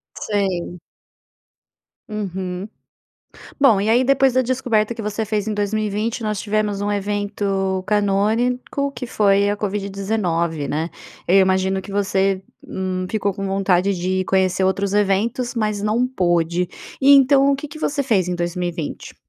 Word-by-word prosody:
Sei. 190 -4 -2 1.3
Uhum. 190 -2 -4 0.9
Bom, 235 -8 +5
e 205 - 0
aí, 235 +3 +4
depois 270 0 +3
da 255 +1 +3
descoberta 245 -4 0
que 230 - -7
você 210 +1 -2
fez 210 -1 -2
em 215 - -1
2020, 215 +2 -1
nós 210 -2 -1
tivemos 210 -1 -1
um 205 0 -1
evento 200 -2 -1
canônico, 220 +7 0
que 250 -1 -6
foi 200 -3 +3
a 205 - 0
COVID-19, 195 -6 -2
né? 160 +3 -2 0.4
Eu 185 - +5
imagino 190 0 +3
que 190 +1 -10
você, 195 -1 +1 0.2
hum, 185 -1 -3
ficou 205 -2 -1
com 195 +1 -5
vontade 195 0 +1
de 185 +1 -1
conhecer 190 0 +1
outros 195 +1 0
eventos, 210 +5 +1
mas 215 -3 -1
não 215 +4 +1
pôde. 175 -7 0 0.3
E 280 +1 +7
então, 275 0 +5
o - - +3
que 275 +2 -6
que 300 +2 -10
você 290 -2 -1
fez 215 -9 +1
em 180 - -2
2020? 175 -2 -4
200 Hz, 145 wpm, -21 LUFS, 190-220 Hz, 1.3 s, E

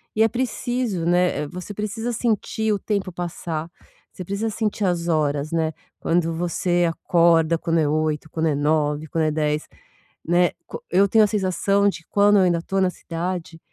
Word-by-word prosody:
e 220 - +4
é - - +5
preciso, 240 -5 -2
né. 175 -2 +2
É, - - -5
você 180 +5 -7
precisa 220 +3 -3
sentir 220 -1 0
o 200 - -1
tempo 200 -3 -2
passar. 170 -2 -4 0.4
Você 185 - -8
precisa 200 +5 -2
sentir 215 -1 -1
as 175 -1 0
horas, 150 -2 0
né. 160 -1 0 0.3
Quando 165 0 +1
você 175 +1 0
acorda 165 -1 +3
quando 165 0 0
é 150 - +2
8, 155 0 -1
quando 160 +1 -1
é 150 - +1
9, 150 +1 0
quando 160 +1 0
é 155 - +1
10, 150 0 -1 0.6
né? 175 +1 +3 0.2
Co - - -8
eu 195 +2 +4
tenho 220 +1 +5
a - - +4
sensação 200 0 +1
de 170 -4 -4
quando 205 0 +4
eu 190 - +5
ainda 175 -2 +3
estou 195 +3 -3
na 185 - +3
cidade, 170 -1 -5
175 Hz, 185 wpm, -23 LUFS, 160-200 Hz, 0.6 s, é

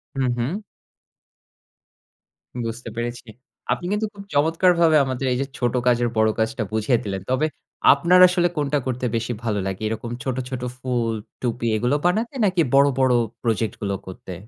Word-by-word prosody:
হু, 135 - -1 0.2
হুম। 145 - -2 2.1
বুঝতে 115 +1 -5
পেরেছি। 120 0 -4 0.4
আপনি 175 - -1
কিন্তু 210 +1 0
খুব 200 -1 -10
চমৎকারভাবে 165 +2 +4
আমাদের 130 0 -3
এই 125 - +1
যে, - - 0
ছোট 120 0 0
কাজের 120 -1 +3
বড় 110 0 +4
কাজটা 110 +1 0
বুঝিয়ে 110 +3 +2
দিলেন। 95 -2 -4
তবে 130 +4 +2 0.5
আপনার 170 +6 +4
আসলে 175 -1 +2
কোনটা 145 0 +1
করতে 125 0 -2
বেশি 115 +1 -1
ভালো 105 -3 0
লাগে? 95 +2 -4
এরকম 115 +2 -4
ছোট, 130 -2 -2
ছোট, 130 -2 -4 0.2
ফুল, 120 -3 -1 0.3
টুপি 120 -1 -1
এগুলো 125 +6 +1
বানাতে 220 +9 +1
নাকি 185 -3 +2
বড়, 140 +1 +6
বড়, 130 -1 +3 0.3
প্রজেক্ট 115 -1 0
গুলো 100 -1 -1
করতে? 95 0 -8
125 Hz, 160 wpm, -23 LUFS, 115-150 Hz, 2.1 s, বড়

